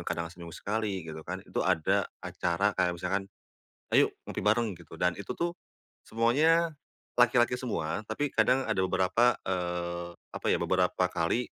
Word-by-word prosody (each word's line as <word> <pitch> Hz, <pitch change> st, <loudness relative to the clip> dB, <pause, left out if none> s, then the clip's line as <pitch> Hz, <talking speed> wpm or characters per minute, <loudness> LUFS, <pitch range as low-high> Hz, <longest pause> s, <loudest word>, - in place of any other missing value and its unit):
kadang 85 Hz, 0 st, -3 dB
seminggu 85 Hz, -2 st, -10 dB
sekali 100 Hz, -4 st, -2 dB
gitu 80 Hz, -1 st, -7 dB
kan, -, -, -4 dB
itu -, -, -3 dB
ada 95 Hz, +4 st, +2 dB, 0.2 s
acara 95 Hz, +4 st, 0 dB
kayak 90 Hz, -2 st, +1 dB
misalkan, 95 Hz, +3 st, -2 dB, 0.6 s
"Ayo -, -, +6 dB, 0.2 s
ngopi -, -, -4 dB
bareng," 110 Hz, +1 st, +2 dB
gitu, 85 Hz, -2 st, -12 dB
dan 90 Hz, +2 st, +2 dB
itu 100 Hz, -, -5 dB
tuh 170 Hz, 0 st, 0 dB, 0.5 s
semuanya 155 Hz, +9 st, +3 dB, 0.5 s
laki-laki 120 Hz, 0 st, +4 dB
semua, 105 Hz, -9 st, -2 dB
tapi 135 Hz, +6 st, -2 dB
kadang 130 Hz, +1 st, +3 dB
ada 110 Hz, -5 st, 0 dB
beberapa, 105 Hz, +6 st, +3 dB
eee, 85 Hz, -1 st, -3 dB, 0.2 s
apa -, -, -6 dB
ya, -, -, +4 dB
beberapa 90 Hz, 0 st, +1 dB
kali 85 Hz, +9 st, +1 dB
95 Hz, 150 wpm, -29 LUFS, 85-120 Hz, 0.6 s, Ayo